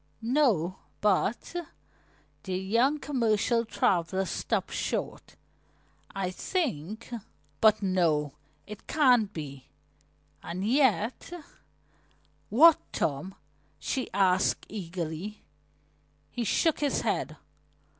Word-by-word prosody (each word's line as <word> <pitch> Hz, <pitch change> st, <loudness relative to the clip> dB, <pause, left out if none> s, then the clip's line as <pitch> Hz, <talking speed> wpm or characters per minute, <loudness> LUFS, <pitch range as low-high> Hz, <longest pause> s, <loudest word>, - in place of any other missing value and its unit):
"No, 225 Hz, -, +2 dB, 0.2 s
but 210 Hz, -, +1 dB, 0.5 s
" -, -, -36 dB
The 185 Hz, -1 st, -2 dB
young 230 Hz, +10 st, +2 dB
commercial 235 Hz, -4 st, +1 dB
traveler 190 Hz, -2 st, +1 dB
stopped -, -, -2 dB
short. -, -, -3 dB, 0.7 s
"I 190 Hz, -2 st, -3 dB
think 220 Hz, -, -3 dB, 0.5 s
But 215 Hz, -1 st, +5 dB
no, 165 Hz, -7 st, +1 dB, 0.3 s
it 210 Hz, -1 st, -11 dB
can't 250 Hz, -9 st, +4 dB
be. 140 Hz, -6 st, -8 dB, 0.7 s
And 185 Hz, +3 st, -4 dB
yet 255 Hz, -, +1 dB, 0.6 s
" -, -, -36 dB, 0.5 s
"What, 310 Hz, +8 st, +7 dB
Tom?" 155 Hz, +7 st, -2 dB, 0.4 s
she 260 Hz, -, -3 dB
asked 190 Hz, -1 st, +2 dB
eagerly. 180 Hz, 0 st, -5 dB, 0.9 s
He 240 Hz, -, -3 dB
shook 320 Hz, -, +2 dB
his 290 Hz, -2 st, 0 dB
head. -, -, -2 dB
205 Hz, 95 wpm, -28 LUFS, 180-245 Hz, 0.9 s, What